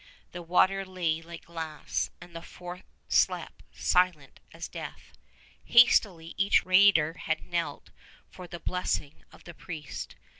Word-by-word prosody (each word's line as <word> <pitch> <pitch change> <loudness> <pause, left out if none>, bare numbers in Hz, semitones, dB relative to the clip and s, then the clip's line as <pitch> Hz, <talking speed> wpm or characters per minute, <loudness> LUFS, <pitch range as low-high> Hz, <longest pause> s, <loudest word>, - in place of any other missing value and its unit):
The 180 - -7
water 185 +3 +2
lay 175 -4 -2
like 170 0 -11
glass, 160 -3 -4
and 170 - -14
the 165 - -6
fort 180 +1 -9 0.3
slept - - +1
silent 180 -6 +1
as - - -7
death. - - -9 0.5
Hastily 195 -9 +4
each 200 +1 +3
raider 185 -4 +5
had 160 -1 -3
knelt 170 -1 -3 0.4
for 180 -1 -11
the 175 0 -8
blessing 170 -5 -3
of - - -17
the 170 - -10
priest. 155 -4 -8
175 Hz, 135 wpm, -28 LUFS, 165-185 Hz, 0.5 s, raider